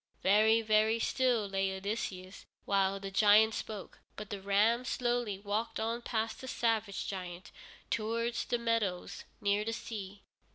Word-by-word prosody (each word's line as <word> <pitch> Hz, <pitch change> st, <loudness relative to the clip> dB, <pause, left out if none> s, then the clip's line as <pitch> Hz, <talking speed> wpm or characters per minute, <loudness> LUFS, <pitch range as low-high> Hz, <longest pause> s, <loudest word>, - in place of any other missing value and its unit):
Very, 220 Hz, +3 st, +5 dB
very 215 Hz, +1 st, +3 dB
still 240 Hz, -2 st, +1 dB
lay 195 Hz, 0 st, 0 dB
Odysseus 190 Hz, -2 st, -5 dB, 0.2 s
while 195 Hz, 0 st, +1 dB
the 195 Hz, 0 st, -6 dB
giant 215 Hz, +2 st, +5 dB
spoke, 210 Hz, -2 st, -6 dB, 0.2 s
but 210 Hz, -1 st, -8 dB
the 200 Hz, -2 st, -4 dB
ram 210 Hz, +5 st, +3 dB
slowly 240 Hz, -4 st, -1 dB
walked 205 Hz, +3 st, -2 dB
on 230 Hz, +2 st, -1 dB
past 225 Hz, -1 st, -2 dB
the 260 Hz, -, -7 dB
savage 225 Hz, -5 st, -1 dB
giant, 180 Hz, -2 st, -6 dB, 0.4 s
towards 230 Hz, +2 st, -1 dB
the 240 Hz, -, 0 dB
meadows 230 Hz, -6 st, -1 dB, 0.2 s
near 205 Hz, +1 st, +2 dB
the 225 Hz, +1 st, -2 dB
sea. 205 Hz, -3 st, -7 dB
215 Hz, 140 wpm, -32 LUFS, 195-230 Hz, 0.4 s, Very